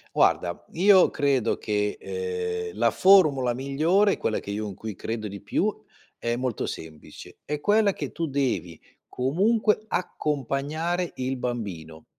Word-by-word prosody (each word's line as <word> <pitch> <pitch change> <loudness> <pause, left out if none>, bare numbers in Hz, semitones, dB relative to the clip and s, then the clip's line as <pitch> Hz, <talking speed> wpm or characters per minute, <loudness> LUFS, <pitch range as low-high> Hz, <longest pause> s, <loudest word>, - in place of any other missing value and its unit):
Guarda, 85 -1 +2
io 190 +2 +6
credo 135 -6 +1
che, 105 -1 -1
ehm, 450 -1 -4
la - - +3
formula 150 -11 +5
migliore, 160 +10 +2
quella 110 - -1
che 100 - -7
io 105 +1 -3
in 100 - -7
cui 110 +2 -6
credo 110 +3 -4
di 100 -1 -8
più, - - 0 0.4
è 120 0 -1
molto 125 -2 -2
semplice: 80 -1 -9
è 150 0 -3
quella 205 +3 +3
che - - -5
tu 165 -1 -3
devi 125 - -2 0.3
comunque 210 - +1
accompagnare 155 - -2
il 130 +1 -2
bambino, 95 -11 -5
135 Hz, 140 wpm, -25 LUFS, -, 0.4 s, io